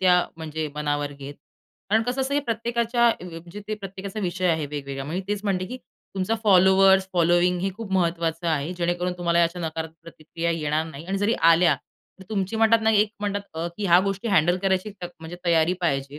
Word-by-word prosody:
त्या 185 -1 +5 0.2
म्हणजे 160 -1 -4
मनावर 145 -1 -2
घेत. 140 0 -9 0.6
कारण 220 +1 +4
कसं 250 +3 -2
असतं, 265 +2 -1
की 290 - +3
प्रत्येकाच्या 235 +1 +1
अ, 225 - -2
म्हणजे 170 +3 -9
ते 215 - -1
प्रत्येकाचा 195 0 -7
विषय 185 0 -1
आहे 160 -2 0
वेगवेगळा. 140 -2 -5
मी 170 +6 -3
तेच 205 -1 -1
म्हणते, 185 -2 0
की 250 - -6 0.4
तुमचा 190 +4 0
फॉलोअर्स, 190 0 +5
फॉलोइंग 175 +1 +3
हे 195 +1 -1
खूप 220 -3 -7
महत्त्वाचं 170 -2 0
आहे, 155 +1 -1
जेणेकरून 175 +1 -1
तुम्हाला 170 -1 +1
या 170 - +6
अशा 170 +2 -3
नकारात्मक 160 0 -5
प्रतिक्रिया 165 +1 -5
येणार 155 -1 0
नाही 150 0 -9
आणि 195 +2 -2
जरी 205 +3 +2 0.2
आल्या 170 +1 +4 0.5
तर - - -11
तुमची 200 0 -2
म्हणतात 225 +1 +5
ना, 220 - +4
एक 210 -1 +3
म्हणतात 205 -1 -1
अ, 165 +1 -2
की 205 - -2
ह्या 175 0 +6
गोष्टी 195 +3 -2
हँडल 175 -3 +3
करायची 190 +1 0
त - - -2 0.2
म्हणजे 165 +2 -8
तयारी 170 0 +3
पाहिजे. 140 -4 -1
180 Hz, 200 wpm, -24 LUFS, 160-200 Hz, 0.6 s, या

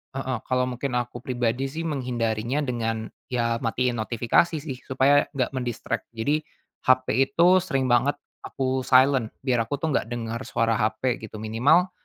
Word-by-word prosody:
heeh, 130 -3 -2
kalau 125 0 +2
mungkin 125 +1 -3
aku 120 0 -5
pribadi 125 +1 -1
sih 165 +2 -4
menghindarinya 125 -3 -1
dengan 115 -4 -2 0.2
ya 115 -1 0
matiin 120 +1 0
notifikasi 120 +9 +2
sih, 135 -4 -6
supaya 135 +2 +3
enggak 130 -1 0
men-distract. 120 -3 -3
Jadi 145 +7 +1 0.5
HP 130 0 +5 0.3
itu 180 +2 +6
sering 135 -7 0
banget 125 +4 +3 0.3
aku 130 0 -1
silent, 130 -2 +4 0.2
biar 125 -4 +2
aku 145 - -1
tuh 160 0 -1
enggak - - 0
dengar 115 -1 -3
suara 115 0 +1
HP 120 +3 0
gitu, 110 - -8
minimal 140 +12 +3
125 Hz, 155 wpm, -25 LUFS, 115-135 Hz, 0.5 s, itu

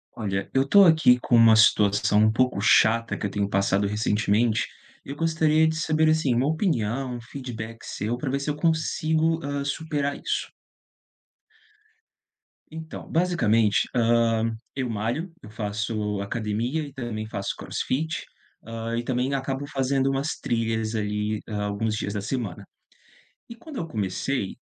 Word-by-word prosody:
Olha, 100 -3 -3
eu 135 - +3
estou 200 +8 +6
aqui 160 -7 +5
com 120 - +2
uma 115 -1 +7
situação 105 -1 +4
um 110 0 +5
pouco 125 -2 +1
chata, 115 +2 +3
que - - -4
eu 100 - -2
tenho 100 0 -1
passado 100 0 +1
recentemente, 105 +2 +1 0.4
eu 140 - -6
gostaria 160 0 +2
de 160 - -1
saber 155 -1 +2
assim 155 -6 +2
uma 125 +4 +2
opinião, 135 - -1
um 120 - -7
feedback 115 -3 -7
seu, 110 +4 -3
para 135 +2 -3
ver 140 +1 -1
se 140 - -3
eu 145 - -1
consigo, 160 0 +1
hã, 140 -1 -3
superar 145 0 -2
isso. - - -2 2.2
Então, 160 0 -8
basicamente, 115 - +2
hã, 115 -1 +2 0.2
eu 130 -3 -3
malho, 115 - -2
eu 105 - -10
faço 105 -1 -3
academia 115 +8 -2
e 140 -2 -9
também 115 -5 -5
faço 100 -2 -3
crossfit, 155 +4 -3 0.4
hã, 115 +1 -4
e 120 - -2
também 130 +2 -1
acabo 135 +1 -3
fazendo 135 -1 0
umas 135 +3 -2
trilhas 115 -1 -1
ali 105 0 -2
alguns 105 +1 -2
dias 100 -1 -3
da 105 - -3
semana, 110 -4 -4 0.8
e 235 - -9
quando 290 +4 -10
eu 165 - -3
comecei, 100 - -2
120 Hz, 150 wpm, -25 LUFS, 110-145 Hz, 2.2 s, uma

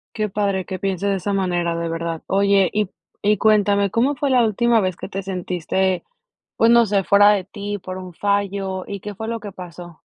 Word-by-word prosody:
Qué 215 -1 -1
padre 195 -2 -1
que 185 -1 -6
piense 195 -1 -2
de 200 -1 +1
esa 200 +2 -3
manera, 175 -3 0
de 170 0 -2
verdad. 165 0 -4
Oye, 195 -1 +3
y 210 -2 0 0.3
y 210 +1 +3
cuéntame, 205 -1 +3
¿cómo 260 +7 +1
fue 280 0 -1
la 250 -2 +4
última 230 +2 +2
vez 185 -2 -1
que - - -7
te 195 +1 -4
sentiste, 185 0 -1 0.5
pues, 230 - +5
no 235 0 +6
sé, 200 -2 +1
fuera 205 +2 +6
de 200 -3 +1
ti, 205 +1 -5
por 185 0 -7
un 185 -1 -8
fallo? 195 0 -1
¿Y 200 -1 -6
qué 210 0 -7
fue 220 - -6
lo 230 0 -3
que 205 -2 -8
pasó? 175 -2 -11
200 Hz, 215 wpm, -21 LUFS, 185-210 Hz, 0.5 s, no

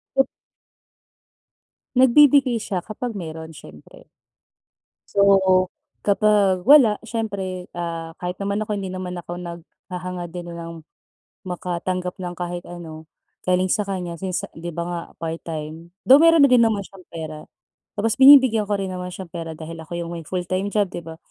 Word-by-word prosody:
Ket 270 0 +4 1.7
Nagbibigay 260 -2 +5
siya 185 -3 -4
kapag 220 0 -5
meron 160 -1 -7
siyempre. 75 - -14 1.1
So, 190 -2 +5 0.4
kapag 200 -3 +3
wala, 260 -4 +7
siyempre, 200 -5 -4
ah, 165 -1 -5
kahit 180 +1 -4
naman 200 +1 -1
ako, 210 -1 -3
hindi 190 -1 -5
naman 180 -1 -5
ako 175 +1 -7
naghahangad 175 +1 -7
din 175 0 -7
ng 165 -1 -9 0.6
makatanggap 180 +1 -3
ng 175 -1 -5
kahit 175 0 -5
ano 160 -3 -9 0.3
galing 185 0 +2
sa 210 - +1
kanya 185 -4 -4
since 185 -2 -2
'di 170 +2 -6
ba 170 +1 -4
nga, 175 -1 -3 0.2
part-time. 160 0 -6 0.2
Though 270 +3 +8
meron 330 -3 +7
na - - +1
din 245 -2 +6
naman 215 -3 +1
siyang 195 -1 -15
pera. 155 -2 -6 0.6
Tapos 225 +1 +1
binibigyan 260 -6 +8
ko 205 - +2
rin 195 - -2
naman 180 0 -5
siyang 185 -2 -9
pera 165 -1 -5
dahil 165 +1 -8
ako 160 - -13
'yong 170 0 -5
may 165 - -6
full-time 185 +4 -2
job, 205 -1 +2
'di - - -5
ba? 160 0 -9
180 Hz, 150 wpm, -22 LUFS, 170-205 Hz, 1.7 s, Though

